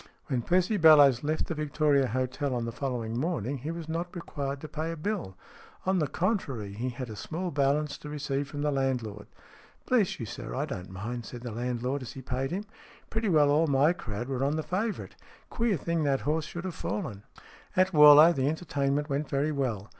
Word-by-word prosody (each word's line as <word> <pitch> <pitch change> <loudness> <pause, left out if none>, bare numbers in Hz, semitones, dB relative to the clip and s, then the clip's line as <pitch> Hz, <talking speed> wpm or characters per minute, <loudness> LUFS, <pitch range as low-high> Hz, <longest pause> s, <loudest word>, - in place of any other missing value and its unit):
When 125 -2 0
Percy 185 - +2
Bellowes 145 -7 +7
left 155 +2 0
the - - -3
Victoria 150 -2 +2
Hotel 130 +2 -1
on 120 -1 -2
the 115 - -3
following 120 -3 -3
morning 140 - -2
he 145 +6 -5
was 165 -1 -5
not 170 +3 -4
required 140 -5 -4
to 155 - -6
pay 155 +2 -3
a 165 - -5
bill. 160 - -3 0.5
On 190 0 +2
the 150 - +1
contrary, 135 - -2
he 120 +5 -3
had 125 +1 -6
a - - -7
small 170 - -4
balance 145 +1 +1
to 150 - -8
receive 145 -1 -2
from 145 +1 -5
the 150 - +1
landlord. 125 -7 -2 0.3
" - - -27
Bless 230 -7 +2
you, 115 - -3 0.3
I 140 +3 0
don't 95 -11 -6
mind," 115 +6 -5
said 120 - -8
the 120 -1 -5
landlord, 125 +4 -2
as 125 - -7
he 135 - -9
paid 130 +2 -2
him. 195 +5 -3 0.2
" - - -25
Pretty 220 -1 0
well 150 -4 +5
all 155 +3 +3
my 140 +4 +4
crowd 120 - -5
were 135 -1 -2
on 140 +2 +1
the 155 - -2
favourite. 205 +6 -3 0.4
Queer 230 -5 +1
thing 165 +2 -1
that 140 -2 +1
horse 155 +1 0
should 175 +1 -6
have 185 - -3
fallen." 105 -4 -4 0.6
II 185 - +7
AT 185 0 -6
Warlow 150 +2 +9
the 135 -3 0
entertainment 145 -3 -1
went 145 0 -2
very 140 +3 +1
well. 120 -9 -2
145 Hz, 210 wpm, -29 LUFS, 125-160 Hz, 0.6 s, Warlow